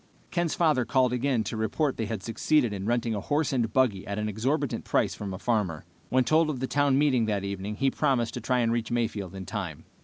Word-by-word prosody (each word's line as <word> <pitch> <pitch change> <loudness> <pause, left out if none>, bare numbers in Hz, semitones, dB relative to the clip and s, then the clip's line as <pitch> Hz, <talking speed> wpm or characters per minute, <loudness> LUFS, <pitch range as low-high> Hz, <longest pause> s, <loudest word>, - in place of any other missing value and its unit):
Ken's 175 -2 0
father 155 -7 +3
called 125 +1 +2
again 125 -2 +1
to 115 - -4
report 120 +7 0
they 110 - -2
had 105 -2 -4
succeeded 120 0 +1
in 100 0 -4
renting 120 -1 +1
a 105 - -1
horse 145 +4 0
and 115 -4 0
buggy 110 -7 +1
at 100 0 -3
an 105 0 -1
exorbitant 130 +7 -1
price - - +1
from 100 -2 -6
a 95 - -4
farmer. 95 -9 -1 0.2
When 130 0 +3
told 155 +6 +3
of 140 -5 -3
the 130 - -1
town 140 0 +2
meeting 135 -5 +3
that 100 -2 -1
evening, 100 +1 -4
he 135 +4 +1
promised 130 -6 +1
to 125 - -5
try 125 +1 +1
to 115 - +1
reach 115 -1 -1
Mayfield 110 -6 -2
in 95 -1 -6
time. 95 -6 -5
120 Hz, 235 wpm, -27 LUFS, 105-135 Hz, 0.2 s, father